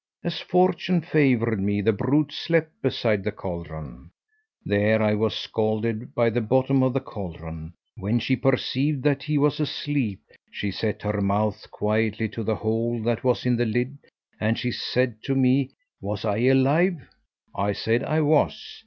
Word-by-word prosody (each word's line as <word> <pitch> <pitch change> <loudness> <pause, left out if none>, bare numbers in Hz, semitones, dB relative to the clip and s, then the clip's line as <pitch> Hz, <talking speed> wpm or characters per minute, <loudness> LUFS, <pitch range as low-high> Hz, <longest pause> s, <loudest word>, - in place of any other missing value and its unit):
As 170 -2 -3
fortune 180 -1 +2
favoured 130 - +2
me, 100 +1 0
the 110 +2 +3
brute 140 +7 +1
slept 165 -1 0
beside 115 -6 0
the 105 - -1
caldron. 80 - -8 0.6
There 105 +2 +3
I 105 -1 +3
was 110 0 0
scalded 110 +1 -2
by 115 -1 +3
the 120 +2 0
bottom 130 +4 +2
of 130 -1 +2
the 135 - +1
caldron. 85 - -8 0.2
When 110 +2 0
she 120 +3 +1
perceived 135 +2 0
that 140 -2 +2
he 150 +1 -1
was 145 0 +2
asleep, 145 -8 -2 0.3
she 100 - -4
set 105 +2 -3
her 105 -1 -1
mouth 100 +1 0
quietly 110 +1 0
to 115 - -6
the 110 +1 0
hole 115 +2 -1
that 120 +1 -1
was 125 -1 +1
in 125 -1 +3
the 120 - +1
lid, 125 +5 -1 0.4
and 110 +1 +1
she 125 - -2
said 120 -2 -1
to 135 - 0
me 130 +1 +3 0.3
'was 105 +1 -4
I 105 -1 0
alive?' 135 - +3 0.5
I 100 +1 0
said 115 +5 0
I 155 +1 +1
was. 155 +7 +1
115 Hz, 165 wpm, -25 LUFS, 105-135 Hz, 0.6 s, the